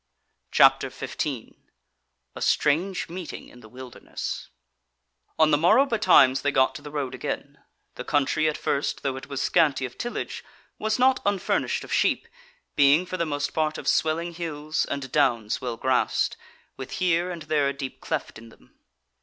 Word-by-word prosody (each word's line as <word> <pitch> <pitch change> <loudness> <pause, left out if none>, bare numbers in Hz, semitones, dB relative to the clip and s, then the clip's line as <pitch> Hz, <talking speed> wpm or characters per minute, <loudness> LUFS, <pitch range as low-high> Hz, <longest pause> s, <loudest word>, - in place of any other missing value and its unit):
CHAPTER - - +5
15 - - -5 0.8
A - - -8
Strange 175 +6 +1
Meeting 175 0 -8
in 125 - -16
the 110 -2 -15
Wilderness 125 +1 -7 0.9
On 155 -1 +4
the 145 - +4
morrow 215 - +5
betimes 175 - +4
they 145 - +1
got 130 -1 +3
to 135 - -9
the 150 - -9
road 145 -3 -3
again; - - -5 0.3
the - - -7
country 145 +2 +1
at 150 - -3
first, 140 - -2
though 135 -1 -1
it 135 0 -8
was 140 -2 -3
scanty 150 -6 +2
of 125 - -10
tillage, 240 - -4 0.4
was 220 0 0
not 260 +1 +4
unfurnished 200 -2 0
of - - -6
sheep, - - +1 0.5
being 145 +4 +5
for 185 0 -5
the 170 - -1
most 145 -1 -2
part 155 -1 0
of - - -8
swelling 165 +2 +1
hills 155 -2 -2
and 135 -2 -5
downs 120 -7 +1
well 120 -2 -4
grassed, 130 0 +1 0.4
with 130 -1 -7
here 180 -1 +1
and 170 -3 -6
there 150 -2 +1
a - - -3
deep 135 -1 -7
cleft - - -4
in 115 0 -13
them. - - -22
150 Hz, 170 wpm, -25 LUFS, 135-170 Hz, 0.9 s, CHAPTER